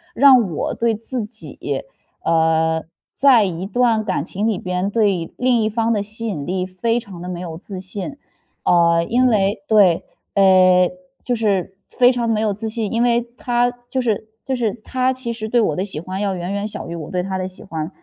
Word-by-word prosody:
让 255 -6 +6
我 - - -2
对 230 -1 +1
自 230 +1 -4
己， 215 +1 -6 0.4
呃， 160 0 +2 0.3
在 265 -5 +5
一 180 -2 -3
段 230 +1 +2
感 185 -8 -1
情 200 +6 -2
里 220 -4 +1
边 180 +2 -2
对 200 -6 0
另 250 -2 +2
一 215 - +1
方 225 +1 0
的 210 -3 +1
吸 215 +3 -7
引 155 -10 -3
力 185 +2 -1
非 230 +6 -1
常 185 -5 -11
地 180 - -6
没 180 -1 -4
有 165 -3 -6
自 185 +1 -8
信。 200 +9 -6 0.5
呃， 170 -1 +4
因 250 +6 +3
为 205 -3 +1
对， 200 -6 +4 0.3
诶， 185 -2 +5 0.3
就 245 - 0
是 195 -4 -1
非 250 0 +4
常 240 -2 -1
没 215 -1 +1
有 215 -2 +1
自 220 +3 -5
信， 220 -2 -2
因 230 - +1
为 240 -1 +3 0.2
他 245 0 +1 0.2
就 260 - -1
是 220 -2 -1 0.2
就 265 - -1
是 230 -3 0
他 255 +2 0
其 255 -2 -4
实 220 -1 -5
对 240 +1 +3
我 155 -9 +1
的 185 - -1
喜 190 -7 -4
欢 185 +2 -5
要 200 -2 0
远 180 +1 -4
远 200 +1 -2
小 215 - -5
于 170 - -5
我 155 -3 -7
对 180 -1 -1
他 190 0 -3
的 185 - -2
喜 185 - -13
欢， 160 -6 -4
205 Hz, 225 characters per minute, -20 LUFS, 185-230 Hz, 0.5 s, 让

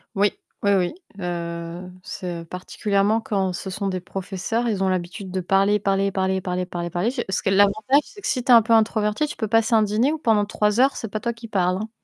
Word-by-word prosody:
Oui. 200 +1 +3 0.3
Oui 200 - +2
oui. 180 -3 +1 0.3
Heu 170 0 -5
c'est, 175 -2 -5
heu, - - -11
particulièrement 200 +4 0
quand 195 -4 -1
ce 190 - -5
sont 195 +2 -3
des 185 -1 -2
professeurs, 195 +5 -3
ils 205 -4 0
ont 190 - +2
l'habitude 185 +2 -3
de 190 - -1
parler, 195 +3 +2
parler, 195 0 +1
parler, 190 -1 0
parler, 180 0 -2
parler 175 -1 -4
parler. 175 +6 0 0.2
Parce 190 - -1
que - - 0
l'avantage, 205 +7 +4
c'est 415 - -14
que 405 - -4
si 250 -3 0
tu 255 - +2
es - - +10
un 230 - +8
peu 225 +1 +1
introverti, 215 +3 +2
tu 300 - -7
peux 220 - -2
passer 225 +1 +2
un 220 - +5
dîner 215 +7 +2
ou 315 - -2
pendant 225 -8 +2
3 210 +2 +1
heures, 270 +1 +3
c'est 225 - -4
pas 215 +1 -4
toi 235 - -1
qui 230 0 -10
parle, 185 -4 +1
hein. 215 +3 -5
200 Hz, 240 wpm, -23 LUFS, 185-220 Hz, 0.3 s, es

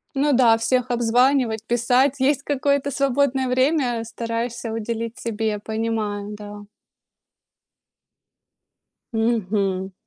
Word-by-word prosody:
Ну 290 +2 +2
да, 235 -3 +5
всех 250 +2 0
обзванивать, 240 -1 +2
писать. 245 +3 +2
Есть 280 +1 +2
какое-то 280 0 0
свободное 270 -1 +1
время. 255 -3 +1
Стараешься 230 +1 -4
уделить 225 +1 -4
себе. 220 -2 -2
Понимаю, 215 -1 -3
да. 205 0 -9 2.5
Мгм. 200 -4 0
235 Hz, 90 wpm, -22 LUFS, 220-260 Hz, 2.5 s, да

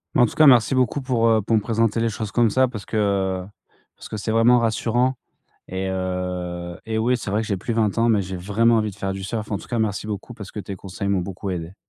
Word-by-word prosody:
Mais - - +5
en - - +7
tout - - -9
cas 155 - +6
merci 125 -3 +6
beaucoup, 130 +2 +1
pour, 120 -3 +1
heu, 110 -1 +4
pour 110 +3 +1
me 110 - +3
présenter 115 0 +1
les 115 - +1
choses 110 -1 -5
comme 115 0 +3
ça, 130 +4 +3
parce 110 -5 -8
que, 110 - -3
heu, 95 -3 0 0.5
parce - - -12
que 110 - -4
c'est 110 +2 -3
vraiment 115 +2 +5
rassurant 120 +3 +1 0.5
et 95 +1 -3
heu, 90 -2 -3
et 110 - -2
oui, 120 +3 +2
c'est 105 - -5
vrai 105 +2 +1
que - - -5
j'ai 100 - -1
plus 115 +5 -3
20 110 -1 +1
ans, 115 +1 +3
mais 105 -3 +3
j'ai 95 0 -5
vraiment 110 +6 +2
envie 110 -1 +1
de 95 - -14
faire 95 -1 -2
du 95 - -6
surf. 110 +3 -4
En-tout-cas 105 +5 -3
merci 105 -1 -1
beaucoup 105 +3 -5
parce 105 -4 -9
que 105 - -6
tes 100 -1 -7
conseils 95 +1 -5
m'ont 100 -2 +2
beaucoup 95 +2 -5
aidé. 85 0 -5
105 Hz, 265 wpm, -23 LUFS, 95-115 Hz, 0.5 s, en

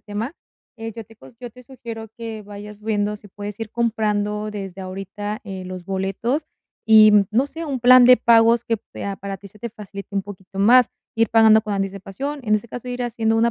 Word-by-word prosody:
tema, 220 +7 -5 0.4
eh, 225 0 -6
yo 225 -2 -7
te 225 +2 -18
cos 135 +12 -16
yo 245 -1 -8
te 250 +2 -15
sugiero 230 -3 -9
que 225 -2 -6
vayas 205 +1 -10
viendo 210 -1 -1
si 205 -1 -16
puedes 205 +2 -8
ir 220 -1 -5
comprando 215 -2 -1
desde 195 -2 -7
ahorita, 195 +4 -6
eh, 190 -2 -7
los 185 -1 -7
boletos 195 - -2 0.4
y, 215 -1 +8
mm, 205 -2 +5
no 250 +6 +2
sé, 325 +3 -7
un 275 -4 -3
plan 250 0 +8
de 250 0 +8
pagos 230 0 +4
que 230 - 0
pea 200 -1 -7
para 195 0 -6
que 200 - -14
se 210 - -19
te 235 +1 -6
facilite 205 -2 -10
un 195 - 0
poquito 195 -1 -11
más 245 +4 +6 0.3
ir 225 -1 +2
pagando 220 -1 +6
con 210 -2 -3
anticipación, 195 +9 -4
en 215 -2 +2
ese 215 - -7
caso, 245 +2 -7
ir 245 0 -3
haciendo 225 -2 0
una 235 +1 +3
215 Hz, 215 wpm, -22 LUFS, 200-235 Hz, 0.4 s, y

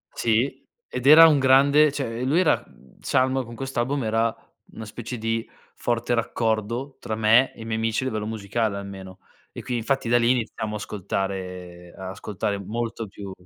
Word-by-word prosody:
Sì, 120 +4 0 0.2
ed 125 +2 -3
era 165 +2 +10
un 150 -3 +4
grande 140 +3 +5
cioè, 120 -5 -4
ehm, 125 - -2
lui 160 +6 +3
era 180 - +2
mhmm, 65 - -22
Salmo 130 0 +1
con 115 0 -10
quest'album 135 +1 -2
era 115 +1 +1 0.4
una 110 - -8
specie 120 +3 -7
di 115 +1 -2 0.3
forte 120 0 -1
raccordo 115 +3 -1
tra 110 - -4
me 110 +4 +4
e - - -13
i - - -7
miei 110 0 -2
amici 115 +2 0
a - - -3
livello 110 -3 -3
musicale 110 -1 -2
almeno. 95 -1 -9 0.3
E - - -8
qui 125 - -3
infatti 120 +2 -1
da 120 - +5
lì 120 +1 +3
iniziamo 110 -3 -2
a - - -2
ascoltare 90 -3 -5
a 95 -1 -6
ascoltare 100 +1 -3
molto 115 +2 -4
più 100 0 -9
115 Hz, 185 wpm, -24 LUFS, 105-130 Hz, 0.4 s, era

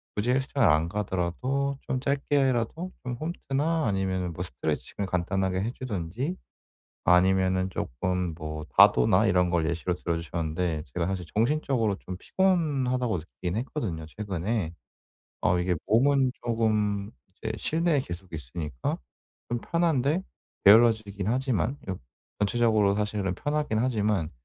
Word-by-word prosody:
굳이 110 +4 +1
헬스장을 135 -2 +2
안 80 0 +3
가더라도 105 +9 -1
좀 130 - -2
짧게라도 140 +3 0
좀 125 - -3
홈트나 155 +2 -1
아니면은 95 -3 -1
뭐 90 - -4
스트레칭을 95 +6 -3
간단하게 95 +1 0
해 115 +4 -1
주든지 125 - -3 0.7
아니면은 95 +1 +4
조금 90 +7 -2
뭐 80 -1 -5
다도나 60 - +6
이런 90 0 +3
걸 85 -2 +1
예시로 85 +1 -1
들어 85 -1 -2
주셨는데 80 0 -2
제가 85 -1 0
사실 95 -2 -3
'정신적으로 115 -3 +1
좀 90 -1 -7
피곤하다.'고 135 - +1
느끼긴 80 +6 -5
했거든요 110 - -3
최근에. 95 0 -3 0.7
어 90 - +3
이게 90 0 +1
몸은 130 +3 +3
쪼금 105 -3 0 0.2
이제 - - -4
실내에 165 -2 +1
계속 90 -6 -8
있으니까 75 -2 -4 0.5
좀 120 -1 -1
편한데 165 -1 +1 0.4
게을러지긴 105 -2 +5
하지만요. 130 0 0 0.6
전체적으로 105 -1 +3
사실은 105 -3 -1
편하긴 150 -6 -1
하지만 105 -8 +1
105 Hz, 320 characters per minute, -27 LUFS, 90-130 Hz, 0.7 s, 다도나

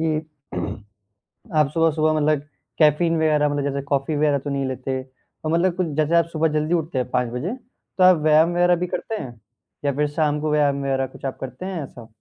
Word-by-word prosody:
कि 160 -1 -1 1.3
आप 150 -2 +4
सुबह-सुबह 155 -1 +2
मतलब, 150 -1 +2 0.4
कैफ़ीन 165 +2 +4
वगैरह 150 -2 +2
मतलब, 145 -1 -1
जैसे 140 0 -2
कॉफ़ी 140 +2 -1
वगैरह 145 -1 +2
तो 145 +2 -6
नहीं 140 -1 -1
लेते। 130 0 -3
तो 130 +4 -10
मतलब, 170 +2 +2
कुछ 185 -2 0
जैसे 155 +2 +2
आप 170 - +5
सुबह 160 0 +2
जल्दी 155 +3 0
उठते 160 -3 -1
हैं 125 -1 -1
5:00 125 -1 +1
बजे, 135 +10 -3 0.5
तो 185 - +4
आप 185 -2 +7
व्यायाम 155 +2 +5
वगैरह 175 0 +4
भी 180 +1 -2
करते 225 - -4
हैं 120 -3 -9 0.5
या 140 - +3
फिर 150 +1 +1
शाम 150 0 0
को 155 0 -1
व्यायाम 145 -2 +2
वगैरह 135 -1 0
कुछ - - -12
आप 135 - -3
करते 130 +7 -7
हैं 185 -5 -3
ऐसा? 120 -4 -11
150 Hz, 205 wpm, -22 LUFS, 140-165 Hz, 1.3 s, आप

